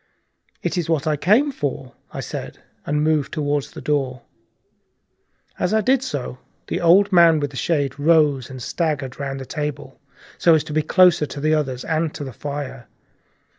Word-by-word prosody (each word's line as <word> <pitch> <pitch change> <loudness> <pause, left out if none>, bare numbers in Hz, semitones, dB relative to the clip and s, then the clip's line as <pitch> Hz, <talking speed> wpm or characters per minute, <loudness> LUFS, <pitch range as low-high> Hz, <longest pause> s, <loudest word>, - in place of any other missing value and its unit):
"It 175 +1 -1
is 170 -1 -3
what 160 -2 +1
I 155 -1 +1
came 215 - +3
for," 140 - -4 0.2
I - - -5
said, - - -6 0.3
and 150 +1 +1
moved 155 -2 +1
toward 145 -2 -1
the - - -11
door. 135 -4 -1 1.4
As 180 - +1
I 220 - +3
did 255 +3 +2
so, 135 - -5 0.3
the - - -3
old 190 +4 +5
man 170 -3 +6
with 145 -1 -2
the - - -12
shade 140 -2 -1
rose 145 -4 +3
and 130 -2 -8
staggered 150 -6 -2
round 135 -1 -4
the 135 - -7
table, 150 0 -5 0.4
so 165 -2 +5
as 155 - +1
to 150 - -7
be 155 - +2
closer 175 -1 +4
to 140 - -7
the 155 +2 +1
others 130 -5 -1
and 160 -1 0
to - - -5
the 130 -3 -7
fire. 140 -2 -6
150 Hz, 180 wpm, -21 LUFS, 140-165 Hz, 1.4 s, man